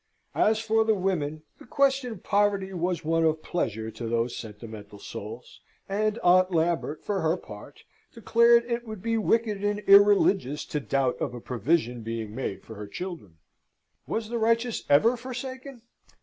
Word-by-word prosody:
As 220 +1 +3
for 225 0 +2
the 220 -1 +2
women, 160 -6 -2 0.2
the - - -15
question 270 -1 +1
of 190 - -13
poverty 200 -2 +1
was 175 -2 -2
one 165 +1 +2
of 160 -1 +1
pleasure 110 -9 -3
to 115 +1 -6
those 115 +1 -1
sentimental 105 -1 -9
souls, 110 +4 -9 0.3
and 215 +2 0
Aunt 185 +1 +5
Lambert, 165 -3 -1
for 205 -2 -1
her 160 +2 +1
part, - - -12 0.3
declared 235 0 +4
it 235 0 -3
would 215 -4 -8
be 230 0 0
wicked 215 -2 0
and 205 0 +1
irreligious 195 -7 +5
to 150 - -3
doubt 135 -2 0
of - - -2
a - - -6
provision 125 +1 -1
being 110 -1 -5
made 100 -6 -4
for 110 - -10
her 105 0 -7
children. 160 - -7 0.7
Was 220 -1 -3
the 235 0 -2
righteous 230 +1 +1
ever 190 +13 +5
forsaken? 260 +1 -7
185 Hz, 165 wpm, -27 LUFS, -, 0.7 s, Aunt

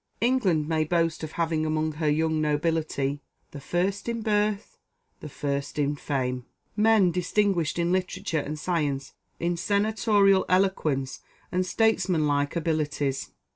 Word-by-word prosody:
England 200 -11 +2
may 160 -1 +1
boast 165 0 0
of 155 - -6
having 165 -2 0
among 155 0 0
her 155 0 -1
young 160 +1 +1
nobility 150 -2 0 0.3
"The 140 - -9
first 190 - -1
in 230 -1 -3
birth, 210 -1 0 0.4
the 150 - -8
first 140 0 -3
in 145 0 +1
fame." 130 -3 -3 0.3
men 210 -4 +4
distinguished 180 -2 0
in 170 0 +1
literature 185 -2 -1
and 150 +1 -4
science, 150 -5 -2 0.3
in 170 0 -1
senatorial 205 0 +3
eloquence 160 -8 +1 0.3
and 185 0 0
statesmanlike 170 -10 +1
abilities. 150 -4 -1
165 Hz, 130 wpm, -26 LUFS, 150-190 Hz, 0.4 s, men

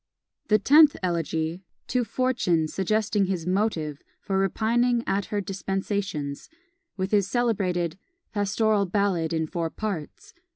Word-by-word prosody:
The 215 - +5
Tenth 295 +7 +6
Elegy, 165 -1 -1 0.3
"To 250 -1 +1
Fortune, 225 -9 +1
suggesting 205 +3 0
his 180 -4 -2
Motive 180 -6 -1 0.2
for 195 -1 -1
repining 235 +5 +1
at 195 0 0
her 205 -1 -2
Dispensations," 195 -6 -3 0.5
with 190 0 -2
his 200 -3 +3
celebrated 190 -7 0 0.3
"Pastoral 205 0 +1
Ballad, 185 -4 0
in 160 -1 0
four 165 0 -3
parts." 190 -6 -6
195 Hz, 120 wpm, -26 LUFS, 170-215 Hz, 0.5 s, Tenth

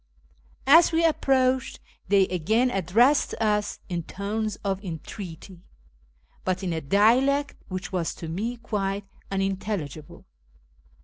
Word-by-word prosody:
As 325 +6 +7
we 330 0 +2
approached, 260 -4 +1 0.3
they 195 0 +5
again 220 +9 +1
addressed 225 - +3
us 210 -2 0
in 175 -3 -2
tones 210 +5 -3
of 195 0 -2
entreaty, 175 +1 -8 0.8
but 185 +1 -1
in 180 -2 -1
a 160 - -2
dialect 250 - +3
which 185 +1 -5
was 175 -3 -2
to 165 - -7
me 215 +9 -3
quite 200 -3 -3 0.2
unintelligible. 195 -6 -3
200 Hz, 115 wpm, -26 LUFS, 185-240 Hz, 0.8 s, As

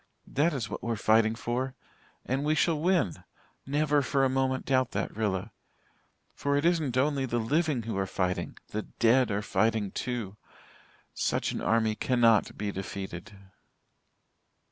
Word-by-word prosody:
That 155 +5 +1
is 130 -8 -3
what - - -6
we're 115 -1 -1
fighting 110 +1 +3
for. 125 +3 -3 0.5
And 135 +3 -1
we 155 +1 +2
shall 160 0 +2
win 170 - +1 0.4
never 145 +1 +2
for 135 0 +1
a - - +2
moment 130 0 0
doubt 130 -2 +1
that, - - -2
Rilla. 105 -4 -1 0.8
For 140 0 0
it 145 - 0
isn't 160 -7 +1
only 135 0 +1
the 120 - -1
living 140 +2 +1
who 115 -1 -4
are 95 - -1
fighting 90 -1 -2
the 110 - -2
dead 120 +3 +2
are 105 0 -1
fighting 110 -1 +1
too. 115 -5 -4 0.8
Such - - 0
an - - -4
army 110 -1 +2
cannot 115 -1 +2
be 105 0 -2
defeated. 95 0 -6
120 Hz, 150 wpm, -29 LUFS, 110-140 Hz, 0.8 s, fighting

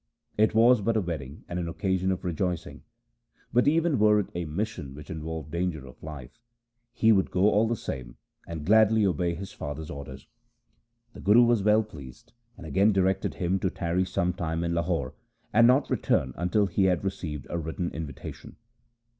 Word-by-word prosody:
• - - -55 0.3
It 110 +1 +2
was 115 +1 +6
but 115 +2 +1
a - - +2
wedding 80 -5 -6
and 90 - -3
an 85 -1 -3
occasion 95 +3 0
of 95 0 -4
rejoicing; 90 0 -3 0.7
but 125 +3 +3
even 160 -3 +2
were 105 0 +5
it 100 - -3
a 85 0 -3
mission 80 -4 -4
which 75 0 -10
involved 80 -1 -6
danger 85 -5 -2
of 65 - -14
life, 75 - -9 0.5
he 115 -1 +3
would 95 -3 +3
go 95 +3 +3
all 110 +2 +3
the 120 - 0
same 65 - -7 0.3
and 80 -3 -6
gladly 110 +1 +5
obey 90 -2 0
his 95 +3 -7
father's 75 +2 -6
orders. 70 -2 -8 0.9
The - - -11
Guru 110 +5 +6
was 120 -3 +3
well 105 +2 +4
pleased, 75 - -13 0.2
and 90 - -10
again 100 +6 +3
directed 95 -1 +1
him 90 +2 0
to 95 - 0
tarry 90 +1 -1
some 90 -1 -1
time 85 -1 -2
in 85 0 -1
Lahore, 85 -6 -1 0.4
and 115 +2 +6
not 130 +3 +4
return 65 -2 +1
until 90 +4 +1
he 95 +1 +1
had 90 -2 +1
received 80 -8 -4
a 85 - -1
written 85 +2 -3
invitation. 80 -3 -8
90 Hz, 185 wpm, -27 LUFS, 80-105 Hz, 0.9 s, was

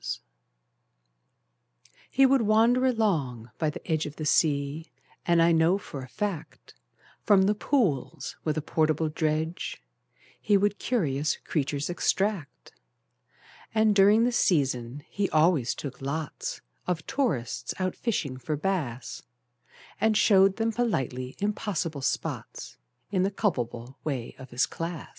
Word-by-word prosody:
He 270 - +5
would 265 -1 +4
wander 230 +4 +4
along 150 - 0
by 155 - +1
the 150 - -8
edge 155 -2 +1
Of 150 - -9
the 155 - -5
sea, 145 +1 +1 0.4
and 170 -1 +4
I 170 - +5
know 165 +3 +4
for 145 -8 -8
a 130 - -8
fact 200 -7 -5 0.5
From 200 -2 +5
the 205 +2 +3
pools 210 - -1
with 155 -1 -1
a 155 - -1
portable 155 0 +1
dredge 160 - -2 0.6
He 205 - +4
would 205 +1 +1
curious 150 - 0
creatures 145 -1 -1
extract: 190 -2 -1 1.0
And, 220 -1 +4
during 205 +3 +6
the 245 - +2
season, 135 - +1
he 200 -1 -1
always 155 -5 +3
took 140 -2 -7
lots 160 - -4 0.3
Of 175 -3 -1
tourists 165 - -1
out 185 -1 -1
fishing 150 - -2
for 130 +4 -3
bass, 145 -9 -3 0.8
And 220 0 +3
showed 195 -2 +5
them 225 +1 0
politely 130 - -2
impossible 195 -7 -2
spots, - - -3 0.4
In 190 -3 +1
the 190 - +2
culpable 125 - -2
way 135 -6 -3
of 130 - -10
his 120 +1 +1
class. 165 -1 -5
165 Hz, 130 wpm, -27 LUFS, 140-205 Hz, 1.0 s, during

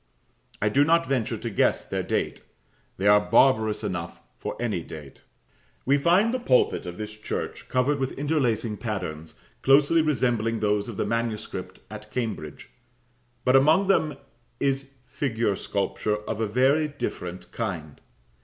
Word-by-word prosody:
I 105 - +1
do 140 +7 +4
not 165 +2 +3
venture 130 -5 -1
to - - -4
guess - - +2
their - - -2
date; - - -2 0.6
they 95 - -3
are 105 0 +7
barbarous 110 -5 +4
enough 85 -4 -4 0.2
for - - -6
any 110 -7 -1
date. 75 -4 -11 0.6
We 140 +2 +3
find 185 - +3
the 255 - 0
pulpit 125 - +2
of 90 0 -6
this 110 0 -5
church 110 0 -5
covered 140 +3 +1
with 130 -1 -1
interlacing 125 -7 0
patterns, 80 -9 -5 0.2
closely 145 +4 +5
resembling 120 -6 +1
those 105 +1 0
of 110 - -7
the - - 0
manuscript 110 -5 -3
at 105 0 -9
Cambridge, 110 - -5 0.7
but 125 +1 +4
among 155 +9 +5
them 155 -6 +2 0.4
is 135 0 0 0.2
figure 115 -5 -1
sculpture 105 +2 -1
of 110 0 -3
a 110 - +1
very 135 +8 +3
different 90 -11 -6
kind. 85 -10 -5
115 Hz, 145 wpm, -26 LUFS, 105-140 Hz, 0.7 s, are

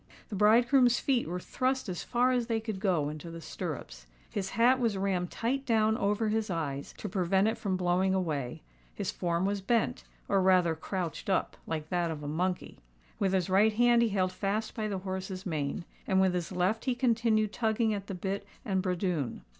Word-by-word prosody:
The 210 - -4
bridegroom's 240 +4 +5
feet 260 -3 +1
were 180 +2 -3
thrust 255 +6 -1
as 180 -2 -3
far 250 +1 +2
as 245 -2 0
they 225 -2 0
could 220 -3 -5
go 180 -8 +1
into 155 +3 -7
the 165 0 -7
stirrups: - - -6 0.2
his 195 -1 -3
hat 250 +3 +5
was 230 -5 +1
rammed 190 -2 0
tight 260 +4 -1
down 220 -4 +2
over 210 +1 +1
his 220 0 0
eyes, 145 -5 -3
to - - -5
prevent 190 +1 +2
it 225 - +1
from 190 -4 -2
blowing 185 +1 +2
away;—his 120 - -4
form 170 +1 -1
was 200 0 -1
bent, 230 +3 0 0.2
or 195 -1 +3
rather 185 -3 +4
crouched 170 +2 -4
up, 190 - +1
like 155 -1 -3
that 175 -2 0
of 155 -2 -5
a - - -4
monkey;—with 175 - -3
his 185 -3 +1
right 205 +3 +4
hand 240 +1 +4
he 235 - +3
held 185 -2 +1
fast 205 +4 -2
by 215 -2 -2
the 200 -2 -2
horse's 190 +1 -5
mane;—and 160 +3 -2
with 190 -1 +3
his 175 -1 -2
left 185 +4 0
he 255 -2 +1
continued 230 -4 +2
tugging 220 -1 +1
at 200 -1 -5
the 195 - -4
bit 195 +2 -3 0.2
and 190 -4 +1
bradoon. 180 - -2
190 Hz, 190 wpm, -30 LUFS, 175-220 Hz, 0.2 s, bridegroom's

